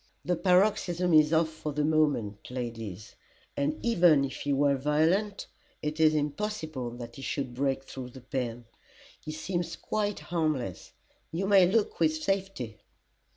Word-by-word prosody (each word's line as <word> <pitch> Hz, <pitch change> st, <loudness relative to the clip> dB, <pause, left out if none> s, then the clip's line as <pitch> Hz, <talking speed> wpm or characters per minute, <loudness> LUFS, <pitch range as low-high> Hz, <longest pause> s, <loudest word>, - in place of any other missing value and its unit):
"The 180 Hz, -, +1 dB
paroxysm 180 Hz, -1 st, +2 dB
is 155 Hz, -1 st, +6 dB
off 160 Hz, 0 st, +3 dB
for 155 Hz, -1 st, -5 dB
the 150 Hz, +1 st, 0 dB
moment, 145 Hz, -10 st, +1 dB
ladies, 115 Hz, -6 st, -6 dB, 0.4 s
and 145 Hz, +2 st, 0 dB
even 170 Hz, -11 st, +5 dB
if 135 Hz, -, -6 dB
he 145 Hz, -, -2 dB
were 140 Hz, 0 st, +3 dB
violent, 160 Hz, +9 st, +1 dB, 0.4 s
it 150 Hz, +1 st, -3 dB
is 155 Hz, -1 st, +5 dB
impossible 150 Hz, -, -2 dB
that 120 Hz, -1 st, -8 dB
he -, -, -8 dB
should 125 Hz, +1 st, -3 dB
break 135 Hz, +1 st, 0 dB
through 130 Hz, -2 st, -8 dB
the 130 Hz, +1 st, -12 dB
pen. 120 Hz, -2 st, -4 dB, 0.5 s
He 155 Hz, -, -7 dB
seems 170 Hz, +1 st, -3 dB
quite 210 Hz, -1 st, -2 dB
harmless 155 Hz, -, -2 dB, 0.4 s
you 175 Hz, +4 st, -1 dB
may 195 Hz, -2 st, +6 dB
look 215 Hz, +1 st, +1 dB
with 155 Hz, -1 st, +3 dB
safety." 190 Hz, -, -2 dB
155 Hz, 150 wpm, -29 LUFS, 130-175 Hz, 0.5 s, is